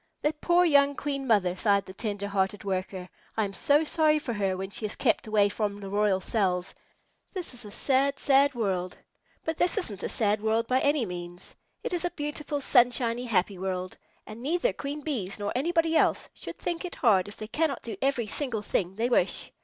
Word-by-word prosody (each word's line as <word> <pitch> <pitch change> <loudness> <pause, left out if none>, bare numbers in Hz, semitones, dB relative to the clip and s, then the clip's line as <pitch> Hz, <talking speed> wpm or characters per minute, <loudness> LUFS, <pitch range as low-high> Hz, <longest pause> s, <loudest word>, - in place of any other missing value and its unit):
"That 300 0 -1
poor 350 0 +4
young 285 -3 +4
Queen 275 -2 -3
Mother!" 190 -6 +3
sighed 200 0 +2
the 190 - -10
tender 205 -1 -3
hearted 195 0 -1
Worker. 185 -1 -3 0.3
"I 220 - +2
am 195 - -6
so 290 +8 +3
sorry 310 -1 +3
for 270 -5 -3
her 195 -3 0
when 190 +1 -5
she 220 - -6
is 215 - -2
kept 230 -3 +1
away 210 -1 +4
from 205 0 -2
the 195 -1 -7
royal 205 -2 +2
cells. 185 -3 0 0.6
This 360 -8 -4
is 245 -2 -8
a - - -8
sad, 275 +5 +1
sad 280 0 +4
world!" 185 -5 -1 0.5
But 320 0 -2
this 355 +4 +2
isn't 210 - -3
a - - -2
sad 210 -2 +1
world 220 +1 +1
by 255 +2 +2
any 285 -3 +2
means. 175 -1 -7 0.3
It - - -3
is 350 - 0
a 350 - +1
beautiful, 295 -2 -4
sunshiny, 245 -2 +3
happy 195 -4 0
world, 185 -1 -3 0.3
and 215 +2 -9
neither 345 - +1
Queen 290 +2 -5
Bees 230 -11 -3
nor 205 -1 -3
anybody 325 +4 +1
else - - +2
should - - -7
think 345 0 -3
it 360 - -5
hard 200 -7 +3
if 205 - -9
they 215 - -6
cannot 295 +2 -1
do 225 -3 -5
every 265 -4 +1
single 225 -1 -2
thing 190 -2 -1
they 230 +3 0
wish. 245 - +1
225 Hz, 205 wpm, -28 LUFS, 200-285 Hz, 0.6 s, poor